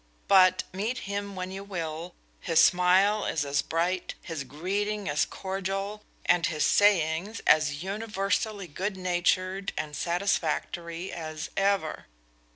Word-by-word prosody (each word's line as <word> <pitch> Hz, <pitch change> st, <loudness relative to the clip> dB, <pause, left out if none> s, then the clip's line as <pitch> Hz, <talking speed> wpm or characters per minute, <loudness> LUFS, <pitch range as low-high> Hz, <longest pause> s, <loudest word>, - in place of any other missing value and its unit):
But, 185 Hz, -2 st, +6 dB
meet 215 Hz, +6 st, -2 dB
him 200 Hz, 0 st, -4 dB
when 185 Hz, 0 st, -4 dB
you 195 Hz, +1 st, -6 dB
will, 170 Hz, -3 st, -5 dB, 0.2 s
his 165 Hz, -3 st, +2 dB
smile 190 Hz, +4 st, +5 dB
is 150 Hz, -3 st, 0 dB
as 140 Hz, 0 st, +1 dB
bright, 175 Hz, +4 st, -1 dB
his 160 Hz, -4 st, -4 dB
greeting 200 Hz, +9 st, -2 dB
as 145 Hz, +1 st, +2 dB
cordial, 195 Hz, +2 st, -4 dB, 0.2 s
and 175 Hz, -1 st, +3 dB
his 155 Hz, -2 st, 0 dB
sayings 195 Hz, 0 st, +3 dB
as 150 Hz, 0 st, +3 dB
universally 205 Hz, 0 st, -2 dB
good 190 Hz, +5 st, -4 dB
natured 185 Hz, +2 st, 0 dB
and 150 Hz, -1 st, -3 dB
satisfactory 170 Hz, 0 st, -1 dB
as 155 Hz, -2 st, -6 dB
ever. 195 Hz, -5 st, 0 dB
185 Hz, 125 wpm, -28 LUFS, 165-200 Hz, 0.2 s, But